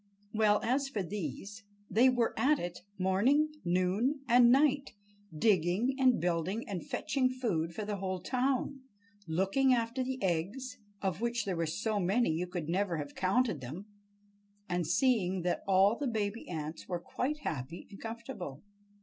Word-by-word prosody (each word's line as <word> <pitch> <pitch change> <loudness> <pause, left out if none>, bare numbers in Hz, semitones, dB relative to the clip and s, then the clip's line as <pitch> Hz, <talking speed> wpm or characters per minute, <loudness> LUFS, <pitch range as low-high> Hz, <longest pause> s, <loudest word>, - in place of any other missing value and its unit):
Well, 215 -1 +3
as 270 +3 +1
for 210 -7 -2
these, 195 - -5 0.3
they 245 +4 +5
were 245 -2 +1
at 295 +3 +3
it 175 -4 -5 0.2
morning, 235 +12 +3
noon, 185 +10 +1
and 240 0 +6
night, 280 0 +3 0.4
digging 195 - +2
and 255 -2 +4
building 175 +6 -1
and 190 -6 -4
fetching 260 -2 0
food 175 -11 -2
for 215 - -3
the 205 -1 -3
whole 185 -1 -3
town, 260 +6 -1 0.5
looking 195 +11 +3
after 235 +2 -1
the 260 0 -3
eggs—of 200 +1 -3
which 235 0 0
there 190 -3 -1
were 165 -1 -1
so 205 +6 -1
many 195 +2 +2
you 170 +3 -1
could 175 -3 -4
never 180 0 0
have 145 -1 -5
counted 195 - +1
them—and 205 - -8
seeing 190 -2 +2
that 180 - -1
all 195 +3 +5
the 285 +2 -2
baby 220 -1 -2
ants 160 -1 -5
were 175 -1 -2
quite 270 - -2
happy 145 - -4
and 195 - -11
comfortable. 225 - -7
205 Hz, 150 wpm, -32 LUFS, 180-245 Hz, 0.5 s, and